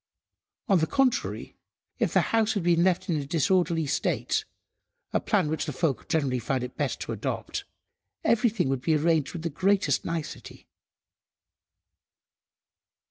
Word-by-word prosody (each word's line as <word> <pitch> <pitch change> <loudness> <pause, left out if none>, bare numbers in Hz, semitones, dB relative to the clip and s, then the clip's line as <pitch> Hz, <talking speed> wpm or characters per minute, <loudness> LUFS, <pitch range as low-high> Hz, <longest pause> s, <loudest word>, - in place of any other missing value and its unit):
On 195 -3 +4
the 160 - +1
contrary, 270 -3 0 0.4
if - - +1
the - - +4
house 225 -1 +3
had 200 - -1
been 170 0 +3
left 185 -1 +1
in 165 - +1
a 145 - -3
disorderly 165 +1 +2
state, 140 - 0 0.7
a - - +3
plan 195 -7 +1
which 155 +1 -2
the - - -1
folk 145 +1 -1
generally 140 -6 +1
found 125 +2 -1
it 125 - -6
best - - -2
to - - -4
adopt, - - -4 0.6
everything 230 - +2
would 135 -1 0
have 130 - -20
been 160 -1 +3
arranged 160 -4 +2
with 170 -2 -6
the 165 - -2
greatest 190 -3 +2
nicety. 165 -2 -6
165 Hz, 150 wpm, -27 LUFS, 145-190 Hz, 0.7 s, On